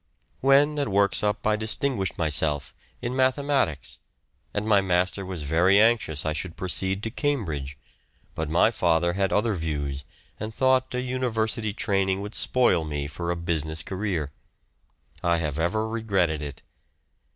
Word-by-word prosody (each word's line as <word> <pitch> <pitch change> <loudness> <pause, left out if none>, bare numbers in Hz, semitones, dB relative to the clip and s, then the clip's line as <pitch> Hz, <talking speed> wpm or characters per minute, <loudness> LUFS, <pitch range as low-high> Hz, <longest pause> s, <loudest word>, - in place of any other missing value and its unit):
When 145 +3 +4
at 140 - 0
Worksop 100 +1 +1
I 110 0 +3
distinguished 110 -1 0
myself 75 -2 +1 0.3
in 120 +2 -2
mathematics, 130 - +1 0.5
and 105 - -2
my 105 -2 +5
master 90 +1 +1
was 90 -4 -5
very 85 +7 +4
anxious 110 -10 +2
I 80 - 0
should 85 +2 -3
proceed 95 +2 -1
to 110 - -3
Cambridge, 80 - -2 0.6
but 80 -1 -3
my 85 +7 +4
father 85 -4 +2
had 95 +1 0
other 110 +1 +2
views, 75 -5 -3 0.4
and 110 +1 -5
thought 130 -1 +2
a 125 - 0
university 115 -4 -1
training 95 -2 0
would 105 +2 -6
spoil 120 -10 +2
me 75 -2 -3
for 80 +4 -5
a 85 - 0
business 80 -2 -2
career. 95 -7 -3 0.9
I 85 -1 +2
have 75 -2 -2
ever 110 +7 0
regretted 100 -9 0
it. 75 -2 -7
95 Hz, 145 wpm, -25 LUFS, 80-110 Hz, 0.9 s, my